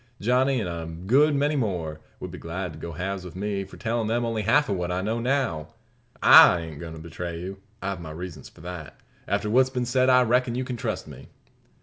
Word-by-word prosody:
Johnny, 130 +4 +2
an' 105 - -2
a 85 -1 -5
good 120 - +2
many 145 +2 +1
more, 90 - -2 0.2
would - - -6
be - - -8
glad 85 +1 -5
to 75 - -11
go 85 +1 -6
halves 95 +3 -4
with 90 -2 -10
me, 100 0 -2
for - - -13
tellin' 115 -1 -1
them 120 +2 0
only 115 -2 -1
half 140 +8 +3
of 100 - 0
what 90 -1 -2
I 90 - -1
now 110 +4 -1
know. 120 - -1 0.5
I 85 - +9
ain't 80 -3 -8
goin' 85 -2 -7
to 80 - -9
betray 85 +1 -6
you. 95 +2 -7 0.2
I've 95 -2 -3
my 80 - -7
reasons 80 -2 -8
for - - -18
not. 85 -3 -8 0.3
After 100 +2 0
what's 130 +4 +4
been 125 -2 -2
said 130 +1 +2
I 125 0 +6
reckon 125 0 +1
you 130 - -1
can 125 -1 -4
trust 115 - -3
me?" - - -11
100 Hz, 230 wpm, -25 LUFS, 85-125 Hz, 0.5 s, I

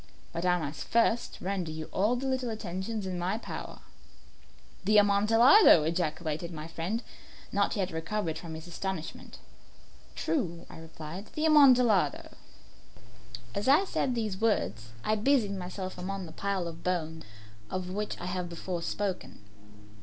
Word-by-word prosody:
But 170 +2 -1
I 180 0 +4
must 155 -3 -5
first 235 0 +2
render 185 -3 -2
you 155 0 -5
all 210 +6 +2
the 255 +2 -3
little 260 -2 -1
attentions 210 0 -4
in 185 -1 -3
my 185 +4 -1
power." - - -7 1.0
"The 210 +3 +4
Amontillado!" 210 - +7
ejaculated 160 0 -2
my 155 -1 -6
friend, 170 +8 -3 0.5
not 200 0 +1
yet 190 -3 -1
recovered 165 +1 -2
from 165 -2 -7
his 160 +1 -8
astonishment. 175 -1 -5 0.8
"True," 170 - -2
I - - -10
replied; 160 +4 -8
"the 310 - 0
Amontillado." 250 - +5 1.2
As 205 - -2
I 290 +8 +6
said 260 -8 -1
these 215 -4 -2
words 115 - 0
I 215 - +1
busied 215 -2 +2
myself 185 0 -6
among 195 +1 -4
the 160 - -10
pile 195 +1 -2
of 165 0 -8
bones 160 -3 -2 0.5
of 185 -1 -3
which 210 +2 -3
I - - -5
have 180 -1 -3
before 170 +1 -4
spoken. 195 +1 -3
185 Hz, 145 wpm, -29 LUFS, 170-215 Hz, 1.2 s, Amontillado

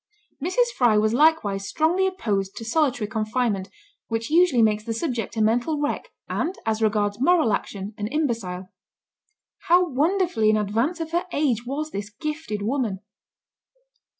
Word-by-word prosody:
Mrs. 480 +8 +1
Fry 235 -4 +4
was 215 +1 +2
likewise 235 -9 +2
strongly 350 - +2
opposed 205 - -2
to 225 - -6
solitary 245 -4 +1
confinement, 215 -2 -1 0.4
which 225 +3 -3
usually 325 -8 +5
makes 215 -1 +2
the 225 0 -3
subject 235 - -3
a 220 - +3
mental 245 +8 +1
wreck, 290 0 -2 0.2
and, 355 +4 -2
as 220 0 0
regards 210 0 +1
moral 315 -6 +4
action, 200 +1 -4
an 205 - -2
imbecile. 225 -10 -2 1.0
How 355 +1 +5
wonderfully 320 - +1
in 215 - +4
advance 225 - 0
of 325 0 -5
her 345 +2 -1
age 250 -7 0
was 305 +4 -3
this 205 +1 -5
gifted 260 -2 -4
woman! 225 -5 -1
235 Hz, 150 wpm, -24 LUFS, 215-315 Hz, 1.0 s, usually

